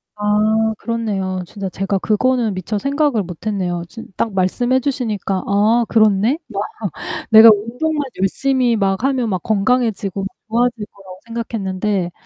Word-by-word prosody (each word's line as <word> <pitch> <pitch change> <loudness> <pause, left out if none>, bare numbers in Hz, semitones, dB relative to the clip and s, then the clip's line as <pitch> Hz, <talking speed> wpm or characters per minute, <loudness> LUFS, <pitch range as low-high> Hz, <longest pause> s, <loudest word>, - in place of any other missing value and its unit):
아 215 +1 +1
그렇네요. 195 -5 -2
진짜 195 0 -5
제가 195 +2 -2
그거는 230 +1 +1
미처 185 +3 -3
생각을 280 -5 +1
못 180 +3 -10
했네요. 180 -5 -2
진 230 +5 -10
딱 225 - -1
말씀해 240 +8 +1
주시니까 220 -8 -2
'아, 215 +4 +2
그렇네?' 215 +5 +3
막 205 -4 -3 0.7
내가 220 0 +9
운동만 265 +9 -2 0.2
열심히 250 +4 +1
막 195 +2 0
하면 260 -4 +1
막 185 -3 -2
건강해지고 210 -3 0 0.2
좋아질 235 -1 0
거라고 190 -2 -13
생각했는데 205 -5 -2
215 Hz, 310 characters per minute, -18 LUFS, 195-240 Hz, 0.7 s, 내가